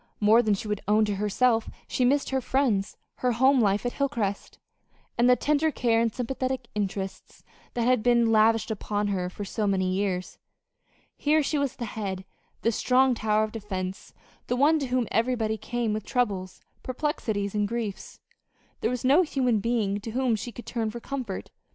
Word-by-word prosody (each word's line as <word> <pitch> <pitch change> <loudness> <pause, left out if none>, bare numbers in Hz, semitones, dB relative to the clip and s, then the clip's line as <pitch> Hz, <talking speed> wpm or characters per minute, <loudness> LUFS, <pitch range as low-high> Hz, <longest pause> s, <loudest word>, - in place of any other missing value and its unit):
More 220 +3 +6
than 215 -3 +2
she 205 - -6
would 210 -1 -2
own 215 +1 +4
to 205 -2 -2
herself 225 +3 +1 0.2
she 255 - 0
missed 275 +3 +2
her 265 0 +1
friends, 240 -7 0 0.2
her 250 -1 +1
home 260 +3 +4
life 205 +1 +1
at 245 - -1
Hilcrest, 235 -8 -2 0.6
and 240 +1 +4
the 250 - +7
tender 300 +4 +1
care 230 -6 +1
and 230 -1 +1
sympathetic 255 +1 -3
interest 195 -2 -4 0.3
that 240 - 0
had 250 -2 +3
been 235 -1 +3
lavished 225 +1 +3
upon 205 -1 -2
her 180 -2 -1
for 205 +3 -7
so 210 +2 -2
many 185 -2 +1
years. 185 -2 -2 0.8
Here 305 +1 +3
she 295 +1 0
was 280 -2 -1
the 240 - -4
head, 195 -3 -5 0.4
the 230 - +3
strong 255 +3 +3
tower 215 -2 +1
of 215 - -3
defense, 190 -3 -5 0.4
the 245 - 0
one 300 +5 +4
to 275 - -2
whom 250 -2 0
everybody 225 -1 +1
came 235 0 -2
with 215 -1 -3
troubles, 200 -8 -2 0.2
perplexities, 235 -7 -2
and 210 -1 +1
griefs. 225 -3 -5 0.6
There 225 - 0
was 250 0 -3
no 280 +7 +6
human 255 -9 +1
being 205 -2 0
to 220 +2 -7
whom 255 -2 +1
she 230 +3 -5
could 240 - -10
turn 225 -3 -2
for 235 - -6
comfort. 245 -6 -5
225 Hz, 180 wpm, -27 LUFS, 205-255 Hz, 0.8 s, the